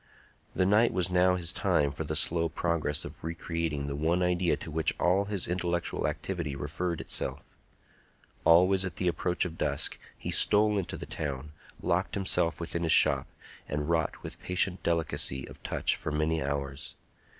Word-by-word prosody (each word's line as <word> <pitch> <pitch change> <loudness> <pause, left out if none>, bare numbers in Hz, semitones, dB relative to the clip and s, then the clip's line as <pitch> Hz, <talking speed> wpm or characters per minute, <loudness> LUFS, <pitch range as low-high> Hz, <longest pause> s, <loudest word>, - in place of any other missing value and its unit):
The 95 - +2
night 105 +5 +4
was 90 0 +1
now 90 +1 +4
his 85 -2 +1
time 70 -1 +1
for - - -5
the - - -4
slow 85 0 +3
progress 85 -3 -1
of - - -10
re 80 +1 -4
creating 80 -4 -3
the 70 0 -3
one 85 +5 +1
idea 90 -1 +1
to 80 - -7
which 80 0 +1
all 95 +3 +3
his 100 -3 -1
intellectual 85 -1 -1
activity 85 -7 -3
referred 80 +4 -3
itself. 65 +3 -3 1.0
Always 90 +3 +5
at 90 -3 -4
the 90 - -1
approach 90 +1 0
of 85 -2 -7
dusk - - 0 0.2
he - - -5
stole 105 0 +5
into 90 - -5
the - - -7
town, 75 -1 -5 0.3
locked - - 0
himself 95 -4 0
within 85 0 -2
his 80 -2 +1
shop, - - +5 0.4
and 75 +2 -2
wrought 80 -2 -1
with - - -7
patient 90 0 0
delicacy 80 -5 0
of - - -13
touch - - -1
for 75 - -5
many 80 +2 0
hours. 70 0 -3
85 Hz, 170 wpm, -29 LUFS, 75-90 Hz, 1.0 s, Always